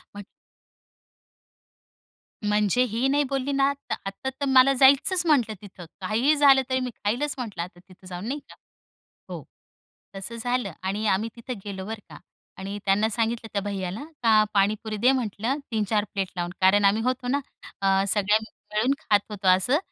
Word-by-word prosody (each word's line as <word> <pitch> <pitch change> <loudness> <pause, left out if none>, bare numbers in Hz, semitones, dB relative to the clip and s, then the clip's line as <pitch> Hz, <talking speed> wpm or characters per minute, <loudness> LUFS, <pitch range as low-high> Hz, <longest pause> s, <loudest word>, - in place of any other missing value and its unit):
म्हण 205 - -7 2.2
म्हणजे 210 +3 +2
ही 240 +4 +1
नाही 285 +2 +2
बोलली 275 0 -1
ना, 275 0 +3 0.2
तर - - 0
आता 195 +7 -4
तर 265 +2 -5
मला 265 0 +6
जायचंच 280 +7 +5
म्हटलं 255 -9 +3
तिथं 190 -3 -11 0.2
काहीही 230 +10 +2
झालं 280 -2 +6
तरी 260 0 +1
मी 255 -1 -3
खाईलच 245 +8 -1
म्हटलं 220 -9 -4
आता 175 0 -12
तिथं 185 +1 -17
जाऊन 180 +1 -7
नाही 280 +4 -3
का. - - -13 0.7
हो, - - -6 0.7
तसं 195 +4 -6
झालं 245 -2 -2
आणि 200 +3 -2
आम्ही 210 +3 +1
तिथं 235 +2 -6
गेलो 190 -2 -6
बरं 220 +1 -5
का - - -11 0.4
आणि 195 +2 -5
त्यांना 205 +3 +2
सांगितलं 225 +1 -2
त्या 200 - 0
भैय्याला, 195 +2 -4 0.2
का 220 -2 +5
पाणीपुरी 210 +2 0
दे 245 +5 +4
म्हटलं, 240 0 -1
3-4 215 -1 0
प्लेट 195 -2 -1
लावून 175 -1 -3
कारण 200 +2 +5
आम्ही 205 +3 +3
होतो 255 0 -1
ना, 275 +3 +1 0.4
अ, 195 0 +3
सगळे 205 +1 +3 0.4
मिळून 230 +6 +2
खात 205 - +3
होतो 200 -2 -4
असं. 190 +10 +4
215 Hz, 165 wpm, -25 LUFS, 195-255 Hz, 2.2 s, मला